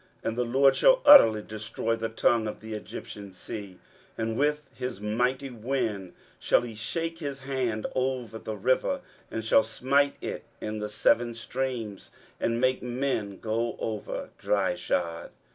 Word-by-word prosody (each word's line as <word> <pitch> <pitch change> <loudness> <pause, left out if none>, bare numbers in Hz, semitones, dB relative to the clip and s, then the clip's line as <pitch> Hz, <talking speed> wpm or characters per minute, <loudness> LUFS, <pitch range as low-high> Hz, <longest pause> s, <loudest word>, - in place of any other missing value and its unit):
23:011:015 - - 0
And 115 - -5
the - - +3
LORD 135 +3 +4
shall - - +5
utterly 115 - +9
destroy 110 +3 -3
the 115 0 -3
tongue 115 0 +2
of 105 - -5
the 110 0 -7
Egyptian 105 -1 -8
sea; 95 0 -8 0.4
and 115 0 -1
with 150 +2 0
his 125 -5 -5
mighty 125 +6 -1
wind 110 -5 -2 0.3
shall - - +3
he 120 -2 -6
shake 165 +10 -3
his 140 -4 -5
hand 130 -5 -2
over 125 -4 -2
the 110 - -5
river, 130 - +1 0.3
and 110 -1 -4
shall 110 - +6
smite 140 +5 +1
it - - -5 0.2
in 110 0 -4
the 105 0 -3
seven 120 +2 +2
streams, 115 -3 -4 0.3
and 115 0 0
make 130 +1 +2
men 120 -5 -2
go 115 +2 -1
over 110 -2 -4
dryshod. 90 -3 -1
115 Hz, 155 wpm, -28 LUFS, 110-130 Hz, 0.4 s, utterly